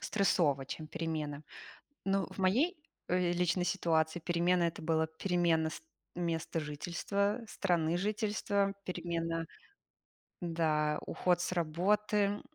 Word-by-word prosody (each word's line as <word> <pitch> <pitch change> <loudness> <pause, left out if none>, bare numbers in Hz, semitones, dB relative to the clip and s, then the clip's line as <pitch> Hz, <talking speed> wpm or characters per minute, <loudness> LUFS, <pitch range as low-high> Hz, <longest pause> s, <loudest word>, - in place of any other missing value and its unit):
стрессово, 160 -9 +2
чем 155 +3 -6
перемены. 155 -2 -3 0.6
Но 195 0 +1
в - - -12
моей, 245 - +3 0.3
э, 180 -1 +2
личной 175 0 +1
ситуации 165 -2 +1
перемены- 175 +1 +2
это 165 - -2
была 160 0 +2
перемена 165 -1 +1
ст - - -8 0.3
места 165 -2 -2
жительства, 190 +8 -1
страны 175 -5 +1
жительства, 205 0 0
перемена, 165 -2 -2 1.0
да, 155 -3 +1
уход 180 -1 +1
с 180 - -1
работы, 200 +5 +1
175 Hz, 110 wpm, -33 LUFS, 160-195 Hz, 1.0 s, моей